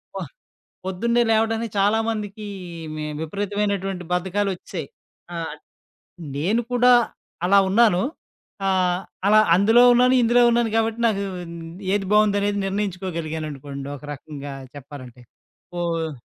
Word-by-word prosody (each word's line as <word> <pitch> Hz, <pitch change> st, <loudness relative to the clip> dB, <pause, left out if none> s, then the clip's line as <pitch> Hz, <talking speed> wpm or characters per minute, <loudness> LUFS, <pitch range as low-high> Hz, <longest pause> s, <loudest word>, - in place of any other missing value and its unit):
ప -, -, -3 dB, 0.7 s
పొద్దున్నే 235 Hz, +6 st, +1 dB
లేవడానికి 225 Hz, +1 st, +1 dB
చాలామందికి 210 Hz, 0 st, 0 dB, 0.5 s
మే 155 Hz, -, -4 dB, 0.2 s
విపరీతమైనటువంటి 195 Hz, +1 st, -2 dB
బద్ధకాలొచ్చెసాయి. 185 Hz, -2 st, -2 dB, 0.5 s
ఆహ్, 165 Hz, -1 st, -4 dB, 0.8 s
నేను 200 Hz, +11 st, +1 dB
కూడా 245 Hz, 0 st, +5 dB, 0.5 s
అలా 195 Hz, +2 st, +5 dB
ఉన్నాను. 205 Hz, -3 st, +4 dB, 0.7 s
ఆహ్, 180 Hz, -2 st, +2 dB, 0.3 s
అలా 215 Hz, +1 st, +6 dB, 0.2 s
అందులో 220 Hz, +6 st, +5 dB
ఉన్నాను, 250 Hz, +1 st, +4 dB
ఇందులో 240 Hz, +1 st, +4 dB
ఉన్నాను 235 Hz, -1 st, +2 dB
కాబట్టి, 225 Hz, 0 st, 0 dB
నాకు 200 Hz, -3 st, 0 dB, 0.7 s
ఏది 205 Hz, -1 st, 0 dB
బావుందనేది 205 Hz, -1 st, +3 dB
నిర్ణయించుకోగలిగాననుకోండి 160 Hz, -8 st, -4 dB
ఒక 150 Hz, -, -12 dB
రకంగా 145 Hz, 0 st, -8 dB, 0.2 s
చెప్పాలంటే. 130 Hz, -3 st, -11 dB, 0.6 s
ఓహ్! 165 Hz, -2 st, -1 dB
195 Hz, 100 wpm, -23 LUFS, 165-220 Hz, 0.8 s, అలా